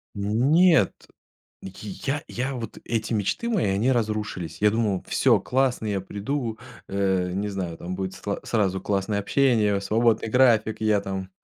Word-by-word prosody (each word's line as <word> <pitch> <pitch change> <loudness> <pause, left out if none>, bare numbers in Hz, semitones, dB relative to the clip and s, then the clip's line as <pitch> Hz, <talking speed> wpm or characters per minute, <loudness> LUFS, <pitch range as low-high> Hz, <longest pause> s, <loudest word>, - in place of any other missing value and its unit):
Нет, 135 - +3 0.7
я 105 +9 -5
я 130 +2 -3
вот 115 -3 -6
эти 115 0 -2
мечты 105 - -1
мои, 215 -7 +1
они 100 +6 +1
разрушились. 105 -7 -2
Я 105 0 +5
думал: 105 -4 0
"Всё - - +3
классно, 130 -3 0
я 100 -3 -1
приду, 110 +3 -3 0.3
э, 95 -2 0
не 105 +2 -2
знаю, 90 -4 -4
там 90 +1 -5
будет 95 0 -4
сла 100 -1 -4
сразу 95 -4 0
классное 100 +1 -1
общение, 110 -4 +2
свободный 110 +2 +1
график, 110 -3 +3
я 105 -2 +3
там, 95 -1 -5
105 Hz, 145 wpm, -25 LUFS, 95-120 Hz, 0.7 s, Я